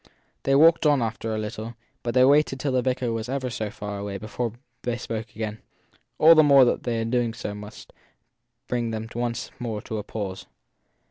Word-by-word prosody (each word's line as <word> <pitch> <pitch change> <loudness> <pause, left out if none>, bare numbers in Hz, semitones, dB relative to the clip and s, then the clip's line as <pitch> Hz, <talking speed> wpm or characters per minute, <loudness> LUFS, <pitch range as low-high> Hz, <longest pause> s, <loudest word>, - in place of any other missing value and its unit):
They 135 - +2
walked 160 +2 +6
on 145 -2 +4
after 115 0 -3
a - - -2
little, 110 +2 -5 0.3
but 120 0 -3
they 130 0 +7
waited 140 -1 +3
till 140 0 -1
the 130 -1 +2
vicar 125 -1 -1
was 115 +1 -4
ever 130 -2 -2
so 110 -1 -3
far 105 -1 -6
away 100 -1 -4
before 110 +2 -4 0.3
they 120 -1 -2
spoke 110 -2 -6
again; 110 0 -4 0.6
all 160 +2 +8
the 155 - +7
more 140 -3 +7
that 120 - +1
their 115 -2 -1
doing 115 -1 0
so 110 -3 -5
must 105 +1 -11 0.7
bring 120 -2 -1
them 110 0 -4
once 120 0 -3
more 115 -3 -3
to 110 - -4
a - - -5
pause. 95 -3 -5
115 Hz, 195 wpm, -25 LUFS, 110-130 Hz, 0.7 s, all